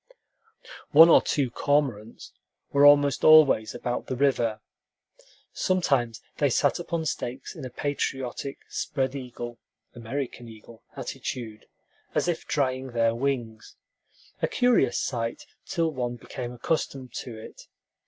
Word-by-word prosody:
One 160 +3 +10
or - - +7
two 135 -5 -1
cormorants 125 -7 -1 0.4
were 140 0 +6
almost 145 -1 +5
always 140 -9 +6
about 120 0 -3
the 130 - -2
river. 120 -5 +1 0.9
Sometimes 135 -12 0
they 145 - +2
sat 130 - +2
upon 170 -2 -3
stakes 130 -4 -4
in - - -9
a - - -5
patriotic, 135 0 -3
spread 135 -3 -2
eagle 120 -3 -7 0.3
(American 120 0 -5
eagle) 110 +1 -14
attitude, 110 -4 -6 0.5
as - - +1
if 175 -2 -2
drying 130 -3 -1
their 115 -1 +2
wings, 120 -3 -3 0.7
a - - +2
curious 245 - +2
sight 115 -3 -3 0.2
till 165 -3 0
one 125 -3 -3
became 120 0 -7
accustomed 130 0 -3
to 115 -3 -7
it. 110 - -12
130 Hz, 125 wpm, -26 LUFS, 120-145 Hz, 0.9 s, One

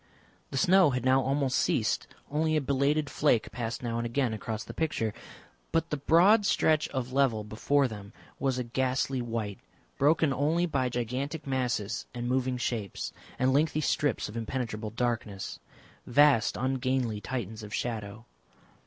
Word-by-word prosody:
The 135 - -4
snow 180 +3 +5
had 125 -2 -2
now 130 +1 +5
almost 135 0 +1
ceased; - - +1 0.2
only 155 +1 +1
a - - +1
belated 140 +3 +1
flake 135 -6 +1
passed 115 0 -4
now 115 -1 -2
and 120 - -2
again 120 -1 0
across 110 0 -4
the - - -9
picture. 130 -9 -1 0.6
But 165 0 0
the 150 - 0
broad 175 +10 +5
stretch 155 -5 +2
of 130 -1 -4
level 130 -6 +2
before 135 +6 +1
them 100 -3 -9 0.3
was 135 -2 0
a 125 - -1
ghastly 130 +1 0
white, 115 -4 -3 0.4
broken 150 0 +3
only 155 +6 +1
by 135 -6 0
gigantic 130 +6 -3
masses 120 -6 -1
and 120 0 -3
moving 130 0 0
shapes 115 -5 -3 0.2
and 130 +1 +2
lengthy 155 +2 +2
strips 145 -1 0
of 105 - -9
impenetrable 115 -2 -3
darkness, 110 -4 -3 0.5
vast 140 -6 +4
ungainly 130 -3 0
Titans 110 -2 -4
of 105 -1 -9
shadow. 110 -1 -4
130 Hz, 155 wpm, -29 LUFS, 115-140 Hz, 0.6 s, snow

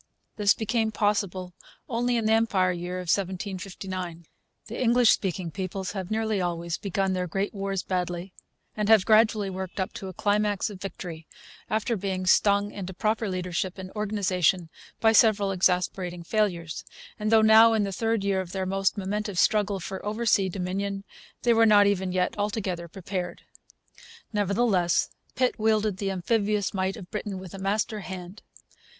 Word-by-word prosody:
This 205 -1 +3
became 220 0 0
possible 200 -4 -1 0.3
only 240 0 0
in 225 - -1
the 220 - +4
Empire 200 -5 +2
Year 175 +1 -4
of - - -3
1759. 185 -2 -3 0.4
The 230 +3 -6
English 240 -1 +5
speaking 180 -3 -1
peoples 190 0 -4
have 190 -3 -5
nearly 220 -2 0
always 170 -1 -2
begun 195 -1 -1
their 180 -1 -1
great 195 +4 -2
wars 195 -2 -2
badly, 180 0 -3 0.4
and 210 0 -1
have 220 -4 +6
gradually 215 -2 +4
worked 190 +1 -6
up 190 - -2
to 195 - -7
a 185 - -7
climax 205 +1 0
of 190 -2 -11
victory 170 -5 -7 0.4
after 220 +2 0
being 190 -2 -3
stung 200 +2 +3
into 190 -2 -7
proper 215 +2 0
leadership 180 0 -3
and 190 0 -8
organization 190 -5 0 0.3
by 225 - +5
several 215 -3 +4
exasperating 180 -1 0
failures; 175 -5 -1 0.4
and 215 +1 -1
though 220 -1 +6
now 220 +1 +7
in 220 -2 +2
the 200 - -2
third 225 +1 0
year 195 -1 +1
of 175 -2 -8
their 190 -1 -2
most 195 +2 0
momentous 205 0 -2
struggle 205 -2 +2
for 190 +2 -6
oversea 210 -2 +1
dominion, 195 +2 -3 0.4
they 240 - +4
were 225 0 +5
not 205 -1 +6
even 190 -2 +1
yet 180 0 0
altogether 195 -5 -2
prepared. 180 0 -5 0.9
Nevertheless, 200 -3 +2 0.2
Pitt 255 -2 +1
wielded 215 -2 +2
the 195 0 -2
amphibious 205 +2 0
might 190 0 -1
of 185 -4 -11
Britain 210 -2 -4
with 185 -2 -9
a 195 - -7
master 210 +3 -1
hand. 185 0 -8
195 Hz, 160 wpm, -26 LUFS, 185-215 Hz, 0.9 s, now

